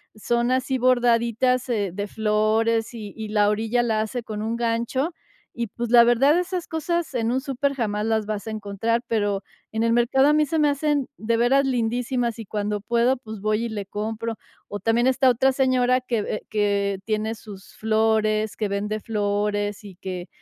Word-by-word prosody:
son 235 +3 0
así 260 +1 +1
bordaditas, 245 0 +2
eh, 205 -4 0
de 200 +2 -4
flores 220 +2 +1
y 210 -3 -7
y 215 -1 -5
la 210 -1 +3
orilla 225 +3 +1
la 220 -2 +1
hace 230 +3 -3
con 215 -1 -5
un 225 +1 -1
gancho 235 +7 -1 0.4
y, 235 -1 -2
pues, 235 +3 -5
la 240 -1 +8
verdad, 270 +7 +4
esas 360 -1 -3
cosas 325 -1 -2
en 230 -2 0
un 260 - +1
súper 275 +1 -1
jamás 215 -3 -1
las 220 -1 +1
vas 210 0 -4
a - - -3
encontrar, 215 +2 -1
pero 205 -3 0 0.3
en 220 +1 -1
el 230 0 +2
mercado 240 +3 +3
a 295 - +5
mí 305 -1 +3
se 320 - -1
me 300 -1 +4
hacen 285 -1 0
de 230 +1 0
veras 270 +4 +3
lindísimas 240 -1 -1
y 225 - -6
cuando 210 0 -2
puedo, 235 +3 +2
pues, 220 -4 -9
voy 215 +3 0
y 235 - -3
le 205 -2 -4
compro. 220 +2 -4 0.3
O 205 - -5
también 230 +4 +2
está 260 0 +4
otra 260 +2 +3
señora 255 -1 +2
que, 245 -2 -2
eh, 210 - -3
que 200 -2 0
tiene 220 +1 -1
sus 205 -3 -12
flores, 220 -1 +1
que 215 - -1
vende 210 +2 -2
flores 205 -1 -1
y 195 -3 -11
que 185 -1 -6
225 Hz, 190 wpm, -24 LUFS, 210-250 Hz, 0.4 s, la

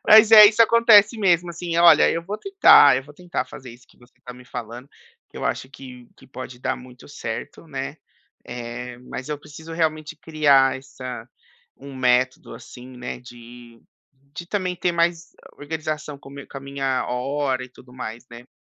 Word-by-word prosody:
Mas 215 0 +7
é 215 -1 +11
isso 225 +2 +4
acontece 230 -1 +5
mesmo 175 -3 +1
assim. 170 0 -5
Olha, 170 -2 +6
eu 165 - -2
vou 205 +4 -6
tentar, 380 - +6
eu 130 - -3
vou 150 +1 -16
tentar 175 +2 -4
fazer 130 -3 -12
isso 120 +1 -17
que - - -26
você 125 0 -23
está 125 - -11
me 125 0 -15
falando, 120 +2 -9 0.4
que - - -17
eu - - -5
acho 130 - -3
que 125 -3 -13
que 130 - -19
pode 130 -1 -10
dar - - -2
muito 125 +1 -15
certo, 115 +4 -7
né, 135 +1 -6 0.5
eh, 120 0 -8
mas 125 +1 -9
eu 150 -1 -4
preciso 155 +2 -12
realmente 155 -1 -2
criar 145 -4 +2
essa 130 -3 -9 0.5
um 140 0 -12
método, 130 0 0
assim, 125 0 -13
né, 125 0 -7
de 120 -1 -15 0.5
de 175 - -8
também 185 -2 -3
ter 175 0 -1
mais 170 0 -1 0.2
organização 155 -1 -6
como 140 0 -14
comi 140 - -10
com 135 - -8
a - - -15
minha 135 -2 -3
hora 130 +1 -2
e 130 - -13
tudo 125 0 -19
mais, 120 -1 -8
né. 120 +1 -12
135 Hz, 185 wpm, -22 LUFS, 125-165 Hz, 0.5 s, é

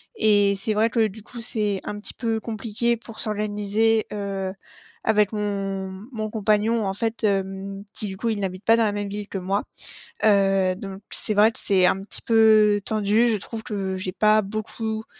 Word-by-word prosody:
et 205 - +4
c'est 215 +3 -1
vrai 220 +2 +2
que 230 -1 +2
du 215 +1 -6
coup, 235 +2 -9
c'est 210 -4 -1
un 205 - -5
petit 205 - 0
peu 225 -2 -1
compliqué 230 +1 -1
pour 225 -1 -12
s'organiser, 215 +1 0
heu, 195 -2 -3 0.5
avec 210 -2 +3
mon 195 -2 -3 0.2
mon 215 -3 -4
compagnon 215 0 +1
en 195 - -2
fait, 225 +2 -2
hem, 195 -1 -1
qui 210 - -1
du 190 -1 -6
coup, 230 - -1
il 215 -2 -1
n'habite 190 -1 -4
pas 225 - +6
dans 230 - +2
la 215 - +2
même 205 0 -3
ville 205 0 -5
que 195 - -5
moi. 195 +2 -1 0.6
Heu, 195 -3 +4
donc 195 0 -8
c'est 215 - -2
vrai 210 +2 +5
que - - -10
c'est 190 -2 +3
un 190 +1 +3
petit 200 - -4
peu 215 -2 +5
tendu. 215 +2 +2
Je 225 - +2
trouve 220 +2 -7
que 195 -3 -3
j'ai 185 0 -4
pas 215 +3 +4
beaucoup 220 +2 -4
210 Hz, 195 wpm, -24 LUFS, 195-220 Hz, 0.6 s, pas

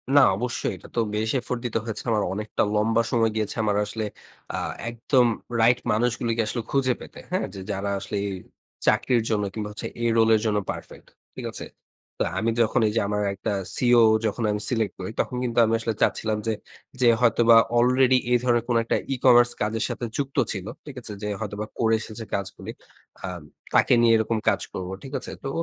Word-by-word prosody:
না 145 - +9
অবশ্যই 120 +3 -2
এটা - - -14
তো - - +1 0.2
বেশ 110 +1 -1
effort 125 0 -4
দিতে 115 -1 0
হয়েছে। 110 - -4
আমার 105 -2 +2
অনেকটা 105 +2 -1
লম্বা 115 +2 +3
সময় 115 -2 +3
গিয়েছে। 110 -2 -2
আমার 105 -1 +1
আসলে 110 +1 -4 0.5
আ - - -2 0.3
একদম 120 +2 +2 0.4
রাইট 120 +2 +5
মানুষগুলিকে 115 0 0
আসলে 120 +1 -2
খুঁজে 130 -2 +2
পেতে। - - -11
হ্যাঁ? - - 0
যে 95 - -7
যারা 100 0 -2
আসলে 100 - -4 0.7
চাকরির 120 -3 +3
জন্য 105 -2 +1
কিংবা 105 -1 -4
হচ্ছে 105 - -5 0.2
এই 115 - +3
role 115 0 +5
এর 105 - +1
জন্য 105 -1 +1
পারফেক্ট। - - -10 0.3
ঠিক - - -6
আছে? - - -5 0.5
তো - - +1
আমি 115 - +1
যখন 115 +2 +2
এই - - 0
যে - - +3
আমার 105 0 -1
একটা 105 +2 -3 0.2
COO 120 -1 +4 0.3
যখন 110 +2 -1
আমি 105 0 -2
সিলেক্ট 115 -4 0
করি 95 +3 -5
তখন 125 - -4
কিন্তু 120 -1 -3
আমি 115 - 0
আসলে 115 0 -2
যে - - -11
চাচ্ছিলাম 110 -1 +1 0.6
যে 120 - +5
হয়তোবা 115 -1 +5 0.2
আলরেডি 130 +1 +4
এই 125 - +6
ধরনের 120 -2 +2
কোন 120 - +1
একটা - - 0 0.2
ই-কমার্স 120 -1 +5
কাজের 110 +1 0
সাথে 120 - -3
যুক্ত 140 0 -3 0.2
ছিল। 95 -2 -5 0.2
ঠিক 145 -3 -9
আছে? 105 - -6
যে - - -2
হয়তোবা 105 0 -4
করে 115 -1 +3
এসেছে 110 +1 -7
কাজগুলি, 100 -1 -4 0.5
আ - - -2 0.5
তাকে - - +5
নিয়ে 115 -1 +5
এরকম 110 +1 0
কাজ 100 - 0
করব। 90 -1 -5
ঠিক 135 +1 -9
আছে? - - -7
তো 135 - -3
115 Hz, 195 wpm, -25 LUFS, 105-120 Hz, 0.7 s, না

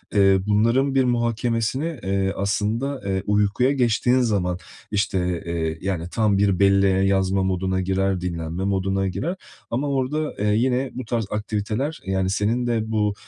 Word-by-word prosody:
eee, 95 -1 +5
bunların 115 +6 +2
bir 135 - +4
muhakemesini, 120 +4 -1
eee, 95 0 0
aslında, 110 +7 -1
eee, 95 0 -1
uykuya 105 +5 +2
geçtiğin 125 -1 +2
zaman, 100 -7 0 0.3
işte, 95 -3 0
eee, 80 -1 -2
yani 90 -3 -3
tam 105 -3 +2
bir 100 -2 +2
belleğe 95 -1 +4
yazma 95 0 +2
moduna 95 0 0
girer, 95 0 0
dinlenme 85 0 -3
moduna 95 0 0
girer. 100 - -2 0.3
Ama 135 +5 -1
orada, 140 +3 -1
eee, 105 - 0
yine 130 +3 +1
bu 130 -2 -6
tarz 115 -1 -1
aktiviteler, 105 +7 -2
yani, 95 -1 0
senin 110 +5 0
de 115 -2 +1
bu, 105 -2 +1
105 Hz, 150 wpm, -23 LUFS, 95-120 Hz, 0.3 s, eee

